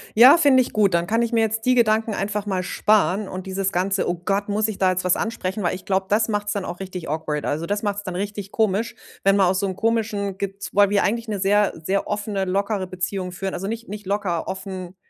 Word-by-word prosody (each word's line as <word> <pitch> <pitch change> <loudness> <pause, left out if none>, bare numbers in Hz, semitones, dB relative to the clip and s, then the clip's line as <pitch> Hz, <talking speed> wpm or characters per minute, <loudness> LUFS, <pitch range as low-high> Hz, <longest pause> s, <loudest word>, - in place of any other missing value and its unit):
ja, 255 +8 +9
finde 280 -5 +5
ich 250 - -4
gut. 205 -4 +3
Dann 170 0 +2
kann 225 +3 +1
ich 235 0 0
mir 230 - +3
jetzt 220 +1 -1
die 255 - +4
Gedanken 220 -2 +2
einfach 205 +1 -2
mal 190 -2 -1
sparen 210 +1 +2
und 185 +1 -6
dieses 190 0 -1
ganze: 190 +2 0
„Oh 175 - 0
Gott, 200 0 0
muss 215 +2 +1
ich 215 - -5
da 190 -1 +4
jetzt 185 0 -2
was 180 - +3
ansprechen?“ 210 -3 -3
Weil 175 - 0
ich 185 - -11
glaube, 190 0 0
das 215 +1 +3
macht's 205 -1 -1
dann 200 -2 -3
auch 175 +1 -6
richtig 185 -3 -6
awkward. 150 -1 -2
Also 155 +3 -1
das 205 +2 -2
macht's 205 -1 -2
dann 185 -3 -5
richtig 205 +1 -4
komisch, 220 +1 0 0.3
wenn 195 0 +4
man 195 -2 +4
aus 185 +1 +1
so 200 - 0
'nem 190 - -4
komischen, 210 -3 -1
gez 200 0 -5
weil 205 0 +5
wir 205 0 +2
eigentlich 230 +2 -1
'ne 210 -2 -3
sehr, 205 +1 +3
sehr 195 +4 0
offene, 205 -2 -2
lockere 195 0 -1
Beziehung 185 0 -3
führen. 190 +2 -4
Also 195 - -4
nicht 230 +1 -5
nicht 210 +1 -7
locker, 195 -4 -1
offen 190 -1 -6
200 Hz, 245 wpm, -23 LUFS, 185-215 Hz, 0.3 s, ja